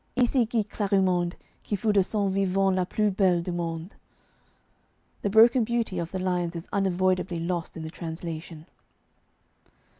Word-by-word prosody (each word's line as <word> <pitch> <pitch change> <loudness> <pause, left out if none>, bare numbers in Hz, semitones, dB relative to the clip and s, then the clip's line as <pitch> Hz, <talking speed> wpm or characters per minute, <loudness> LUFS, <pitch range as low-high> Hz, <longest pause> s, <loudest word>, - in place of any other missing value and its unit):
Ici 245 -1 +2
gît 220 -3 0
Clarimonde 190 -4 +1 0.3
Qui 205 - -2
fut 210 +2 0
de 200 - +5
son 200 +1 0
vivant 195 0 +1
La 185 -1 0
plus 210 +1 +1
belle 185 -3 +2
du 180 - -3
monde. 170 +1 -4 1.3
The 205 - 0
broken 230 +4 +6
beauty 230 -3 -1
of 170 -1 -3
the 190 - -3
lines 180 -2 -1
is 170 - -6
unavoidably 185 -2 +1
lost 170 0 -3
in 160 - -6
the 160 - -6
translation. 165 -1 -7
185 Hz, 150 wpm, -26 LUFS, 175-205 Hz, 1.3 s, broken